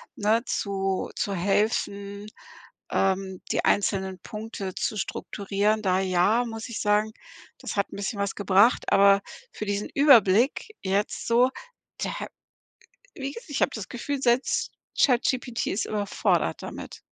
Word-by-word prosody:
ne 220 +3 +2
zu 195 -2 -2
zu 200 - -1
helfen, 200 +1 -1 0.6
ähm, 190 -1 0
die - - 0
einzelnen 190 -2 +1
Punkte 210 -1 -6
zu 215 - -2
strukturieren. 205 +2 -1
Da 185 -1 +2
ja, 190 +6 +2
muss 225 0 -6
ich 235 - -5
sagen, 210 +1 +2 0.5
das - - -5
hat 200 - 0
'n - - -8
bisschen 200 +1 -3
was 200 0 -1
gebracht, 205 +4 +3
aber 200 0 +6 0.3
für 215 - -6
diesen 205 0 -2
Überblick 250 - +5
jetzt 195 +2 -1
so, 245 +2 +4 0.5
da - - -1 1.1
wie 275 0 -5
gesagt, 465 -1 -11
ich 285 - -1
habe - - +3
das 215 -4 -6
Gefühl 275 +3 -4
selbst 245 +1 +1 0.3
ChatGPT 250 -1 +2
ist 205 - -1
überfordert 205 -2 0
damit. - - -8
205 Hz, 135 wpm, -26 LUFS, 195-230 Hz, 1.1 s, aber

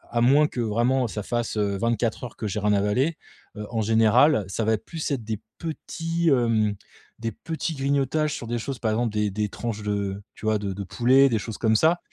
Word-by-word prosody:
à 120 - +3
moins 140 +5 +5
que 125 - -4
vraiment 120 +3 +1
ça 105 -1 -5
fasse, 120 -2 -2
heu, 100 -1 0
24 115 +1 -1
heures 120 - -7
que 110 - -5
j'ai 105 +2 -2
rien 105 0 +2
avalé, 105 +11 +1 0.4
heu, 105 - -5
en 115 -1 0
général 110 +3 +4
ça 110 +4 -2
va 110 - +3
être 105 - -3
plus 160 -2 -4
être 125 -5 -1
des 110 -1 -4 0.2
petits 165 +1 -2
hem, 115 -5 +2 0.4
des 115 0 -2
petits 160 +7 -4
grignotages 140 +2 0
sur 120 - -6
des 120 0 -2
choses 135 +2 -4
par 110 -2 0
exemple 115 0 0
des 105 -1 0
des 105 +1 -1
tranches 110 -1 -4
de 100 -1 -2
tu - - -10
vois 110 -1 +2
de 100 -2 -3
de 100 +1 -5
poulet 130 +7 +4
des 110 -3 +1
choses 115 -1 -6
comme 110 -1 +3
ça 165 +8 +4
115 Hz, 225 wpm, -25 LUFS, 105-135 Hz, 0.4 s, moins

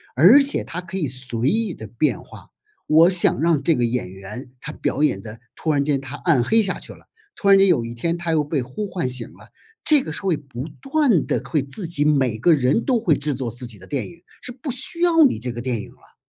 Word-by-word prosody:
而 180 - +7
且 275 0 0
它 180 - -6
可 185 +2 -6
以 155 - -1
随 125 -1 -1
意 220 -1 0
地 110 - -10
变 120 +8 -1
化。 - - -15 0.3
我 160 +3 +5
想 180 -4 +3
让 160 -4 +2
这 165 - +3
个 125 - 0
演 120 -5 -2
员 105 +7 -9
他 - - -7
表 140 - -3
演 100 -10 +1
的 110 0 -10 0.2
突 160 - -2
然 140 -2 +1
间 140 -1 0
他 135 +1 -8
暗 145 -5 +2
黑 225 - +3
下 200 - -1
去 - - -10
了， - - -21 0.3
突 200 - -3
然 195 - +8
间 195 0 +5
有 125 -10 +2
一 115 +1 -7
天 170 +8 -2
他 170 -1 -2
又 155 -2 +2
被 145 -1 -2
呼 130 +12 -5
唤 180 -9 -3
醒 125 -2 -2
了， - - -17 0.4
这 300 -3 +5
个 155 - -6
是 - - -6
会 185 -5 0
不 135 -1 -8
断 275 - +1
地 - - -1
会 150 -4 -1
自 165 +7 -4
己 150 -3 +2
每 135 -7 +2
个 165 +9 +4
人 140 - +1
都 250 -4 +2
会 175 -9 +2
制 145 +1 -2
作 130 -2 -4
自 120 +3 -6
己 115 -4 -10
的 95 - -14
电 140 +3 -3
影， 170 -1 -17 0.2
是 250 - -7
不 255 +4 -8
需 270 +8 -2
要 335 -2 +5
你 265 - +1
这 125 +1 -5
个 120 - -7
电 120 -3 -2
影 - - -11
了。 - - -23
150 Hz, 275 characters per minute, -21 LUFS, 125-190 Hz, 0.4 s, 然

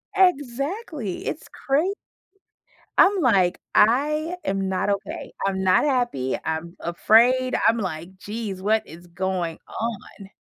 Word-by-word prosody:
Exactly. 290 - 0
It's 310 - -4
cra 280 +5 0 1.1
I'm 390 0 +5
like, 195 - +3 0.2
"I 300 +9 +3
am 195 0 -1
not 190 +1 -1
okay. 275 - -4
I'm 190 -1 -1
not 185 +7 +4
happy. 240 - 0
I'm 160 +2 -4
afraid." 240 +9 +3
I'm 225 +1 +4
like, 185 -2 -5
"Geez, 205 -1 -5
what 215 +3 +1
is 170 +3 -13
going 175 -1 -2
on?" 215 -3 -6
215 Hz, 120 wpm, -24 LUFS, 185-275 Hz, 1.1 s, I'm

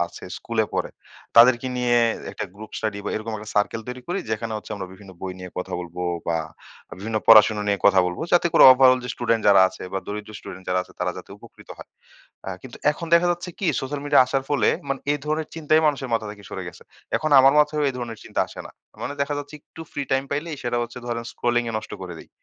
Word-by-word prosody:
আছে - - -12
স্কুলে 115 -2 -1
পড়ে - - -1 0.5
তাদেরকে 120 +1 +7
নিয়ে 120 -1 +2 0.4
একটা - - -4
গ্রুপ 110 +2 -11
স্টাডি 105 -2 -3
বা - - -2
এরকম 110 +1 -5
একটা 105 +1 -9
সার্কেল 105 +2 +1
তৈরি 125 0 -6
করি 180 +3 -1
যেখানে 110 +1 -2
হচ্ছে 105 - -9
আমরা 95 -2 -5
বিভিন্ন 95 0 -13
বই 95 -1 -4
নিয়ে 90 0 -8
কথা 90 - -5
বলবো 90 0 -7 0.3
বা 85 - +1 0.6
বিভিন্ন 110 +2 -3
পড়াশোনা 110 -1 +7
নিয়ে 100 - +1
কথা 95 -2 +6
বলবো। 90 - -4
যাতে 175 0 +5
করে - - +6
ওভারঅল 130 0 +6
যে 125 - -5
স্টুডেন্ট 115 -2 0
যারা 100 -1 +7
আছে - - -12
বা 95 - -1
দরিদ্র 105 +1 -6
স্টুডেন্ট 95 -1 -10
যারা 90 0 +2
আছে - - -17
তারা 90 0 0
যাতে 90 - -12
উপকৃত - - -17
হয়। - - -11 0.6
আ - - -3
কিন্তু 130 -3 -10 0.2
এখন 165 +3 -7
দেখা 170 +1 +5
যাচ্ছে 175 +1 -6
কি 195 - -1
সোশ্যাল 140 +2 -4
মিডিয়া 145 -2 +5
আসার 135 +1 -1
ফলে 145 - +3 0.2
মানে 135 -1 -2
এ - - +1
ধরনের 155 +1 -2
চিন্তাই 155 -1 +2
মানুষের 140 -3 0
মাথা 115 -1 -1
থেকে 105 0 -12
সরে - - -5
গেছে। - - -13 0.3
এখন 155 - -2
আমার 135 +1 +6
মাথায়ও 150 0 +1
এধরনের 120 -3 -6
চিন্তা - - -2
আসে - - -9
না। - - -13 0.3
মানে 140 - -4
দেখা 145 +1 0
যাচ্ছে 145 +1 -8
একটু 160 - -15
ফ্রি 145 - -3
টাইম 135 +1 +1
পাইলেই 150 +1 -3
সেটা 120 0 -1
হচ্ছে 120 +1 -7
ধরেন 115 -1 -3
স্ক্রোলিং 120 0 0
এ - - -6
নষ্ট 110 - -11
করে 90 -2 -7
দেই। - - -13
120 Hz, 225 wpm, -23 LUFS, 105-140 Hz, 0.6 s, তাদেরকে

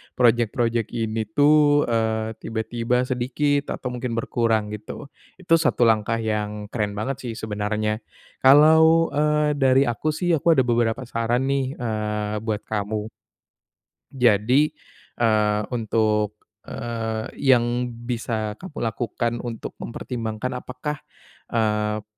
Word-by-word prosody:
project-project 120 -1 +2
ini 110 -1 -2
tuh, 145 +4 +4
eee, 110 -1 0
tiba-tiba 115 +2 -1
sedikit 135 +3 -1
atau 125 - -5
mungkin 125 -1 -4
berkurang 115 -2 0
gitu, 105 +7 -8 0.2
itu 170 -3 +2
satu 155 -6 +2
langkah 110 0 +3
yang 105 -1 -3
keren 105 -3 -2
banget 125 +6 -3
sih 115 - -3
sebenarnya, 105 0 -2 0.4
kalau, 160 +4 +6
eee, 150 +1 +2
dari 135 0 +4
aku 120 +2 -2
sih 175 +2 0
aku 165 +1 +3
ada 130 - +4
beberapa 120 0 0
saran 120 +1 -1
nih, 135 -1 -1
eee, 105 -2 -2
buat 110 -1 -3
kamu. 105 0 -3 1.0
Jadi, 125 +4 +3 0.5
eee, 105 -2 +2
untuk, 110 -2 0 0.3
eee, 115 -2 -4 0.2
yang 125 -2 +2 0.2
bisa 115 -3 -2
kamu 180 -5 -10
lakukan 115 0 -2
untuk 115 -2 -6
mempertimbangkan 115 +1 -4
apakah, 140 +4 -5 0.5
eee, 105 -1 0
115 Hz, 115 wpm, -23 LUFS, 110-130 Hz, 1.0 s, kalau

